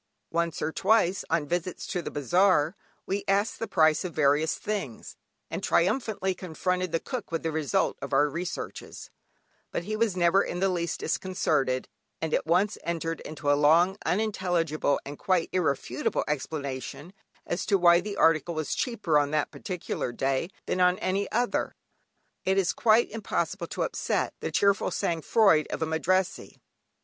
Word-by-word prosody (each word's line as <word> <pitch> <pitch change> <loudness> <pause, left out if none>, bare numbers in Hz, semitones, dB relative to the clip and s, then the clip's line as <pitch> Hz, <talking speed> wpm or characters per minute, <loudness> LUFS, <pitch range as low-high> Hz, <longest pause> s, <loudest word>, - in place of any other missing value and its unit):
Once 170 -1 -1
or 155 - 0
twice, 190 -2 +2
on 160 -2 +1
visits 175 +3 -3
to 180 - -2
the - - -5
bazaar, 175 +2 +2 0.3
we 200 +1 -2
asked 200 +2 +1
the 225 - -3
price 155 -3 +3
of 180 -3 -6
various 150 +1 +3
things, 195 - -5 0.4
and - - -3
triumphantly 190 0 +1
confronted 180 0 -2
the 165 - +1
cook 250 -3 -6
with 165 - -2
the 165 - -1
result 150 -5 0
of - - -6
our 150 - +4
researches, 170 +5 -6 0.6
but - - -3
he 215 +4 -3
was 215 -4 0
never 175 +2 +4
in 175 - -3
the 195 +1 +2
least 170 -2 -2
disconcerted, 155 -8 0 0.3
and 160 -1 -3
at - - 0
once 185 +5 +2
entered 165 -1 -2
into 150 -2 -2
a - - +6
long, 160 +6 +4
unintelligible, 175 -8 0
and 145 +1 -8
quite 185 -3 +1
irrefutable 140 -8 0
explanation 140 +2 -4 0.3
as 175 - -2
to 200 - +2
why 175 -1 +6
the 200 +1 -5
article 165 +1 +3
was 155 -1 -2
cheaper 200 -11 +1
on 145 -1 0
that 155 0 0
particular 180 -8 -4
day 135 +6 -1 0.2
than 185 - -1
on 180 0 +4
any 195 +2 -1
other. 240 +2 0 0.7
It 190 +1 +1
is 190 -3 +2
quite 225 0 +3
impossible 190 -4 -2
to - - -2
upset - - -1
the - - -4
cheerful 200 0 +2
sang 170 -5 -1
froid 195 -6 +4
of - - -2
a - - +1
Madrassee. 175 +4 -1
175 Hz, 165 wpm, -27 LUFS, 155-190 Hz, 0.7 s, a